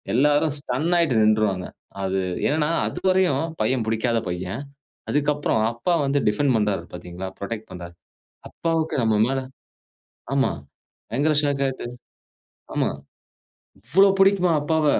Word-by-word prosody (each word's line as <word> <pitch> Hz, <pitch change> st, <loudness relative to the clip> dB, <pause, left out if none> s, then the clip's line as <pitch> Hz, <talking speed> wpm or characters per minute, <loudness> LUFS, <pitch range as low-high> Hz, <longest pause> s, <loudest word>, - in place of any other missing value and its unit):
எல்லாரும் 145 Hz, +2 st, +3 dB
ஸ்டன் 140 Hz, +5 st, -2 dB
ஆயிட்டு 135 Hz, -10 st, +3 dB
நின்றுவாங்க. 105 Hz, -4 st, +2 dB, 0.4 s
அது 95 Hz, 0 st, 0 dB, 0.3 s
என்னன்னா, 150 Hz, +1 st, +1 dB, 0.2 s
அதுவரையும் 185 Hz, -6 st, +1 dB, 0.2 s
பையன் 125 Hz, +2 st, +1 dB
புடிக்காத 115 Hz, +1 st, +1 dB
பையன். 90 Hz, +7 st, -4 dB, 0.5 s
அதுக்கப்புறம் 145 Hz, -5 st, +1 dB
அப்பா 120 Hz, +10 st, -1 dB
வந்து 140 Hz, +1 st, +1 dB
டிஃபெண்ட் 130 Hz, +4 st, +1 dB
பண்றாரு 105 Hz, -5 st, 0 dB
பார்த்தீங்களா? 90 Hz, +1 st, -7 dB
புரொடெக்ட் 110 Hz, +2 st, -5 dB
பண்றாரு. 85 Hz, -1 st, -8 dB, 0.6 s
அப்பாவுக்கு 165 Hz, -1 st, -1 dB
நம்ம 110 Hz, -1 st, +2 dB
மேல 135 Hz, +1 st, 0 dB, 1.0 s
ஆமா. 135 Hz, -1 st, +2 dB, 0.6 s
பயங்கர 145 Hz, +6 st, +2 dB
ஷாக் 140 Hz, -1 st, +1 dB
ஆகுது. 130 Hz, -2 st, -5 dB, 0.9 s
ஆமா. -, -, +1 dB, 0.9 s
இவ்வளவு 190 Hz, -, +4 dB
பிடிக்குமா 195 Hz, -3 st, +4 dB
அப்பாவ 155 Hz, +1 st, +1 dB
135 Hz, 115 wpm, -23 LUFS, 110-155 Hz, 1.0 s, இவ்வளவு